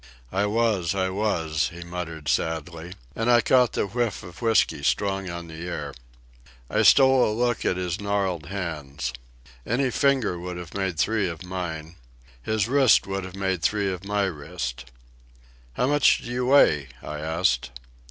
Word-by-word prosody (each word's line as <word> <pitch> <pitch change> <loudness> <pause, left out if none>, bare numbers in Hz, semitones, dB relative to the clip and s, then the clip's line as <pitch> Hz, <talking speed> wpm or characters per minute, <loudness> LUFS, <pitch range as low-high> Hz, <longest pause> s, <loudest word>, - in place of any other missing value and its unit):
"I 100 +2 +1
was, 105 -5 +1
I 95 -1 0
was," 80 -8 0
he 85 0 -9
muttered 85 -3 -6
sadly, 80 +2 -2 0.2
and 115 +1 0
I 120 -1 +6
caught 125 +1 +3
the - - 0
whiff 115 0 -2
of 90 +2 -12
whiskey 115 -10 +2
strong 95 +4 0
on 85 0 -6
the 80 +2 -7
air. 75 -5 -5 0.8
I - - +2
stole 130 -2 +6
a - - +2
look 120 +2 0
at 90 - +1
his 90 +1 -3
gnarled 95 -6 -1
hands. 75 -9 -4 0.5
Any 125 - 0
finger 130 -10 +1
would 90 0 -6
have 90 -1 -9
made 95 -4 -2
three 105 +1 +1
of 85 +1 -7
mine. 85 -3 -5 0.4
His 110 - 0
wrist 135 -3 +4
would 95 0 -3
have 95 0 -8
made 95 -3 -1
three 100 0 +1
of 90 0 -8
my 100 0 0
wrist. 65 -8 -5 0.8
"How 125 - 0
much 145 +1 +3
do 120 - -6
you 125 0 -1
weigh?" 75 - +5 0.2
I 75 0 -5
asked. 80 -6 0
95 Hz, 165 wpm, -25 LUFS, 80-110 Hz, 0.8 s, I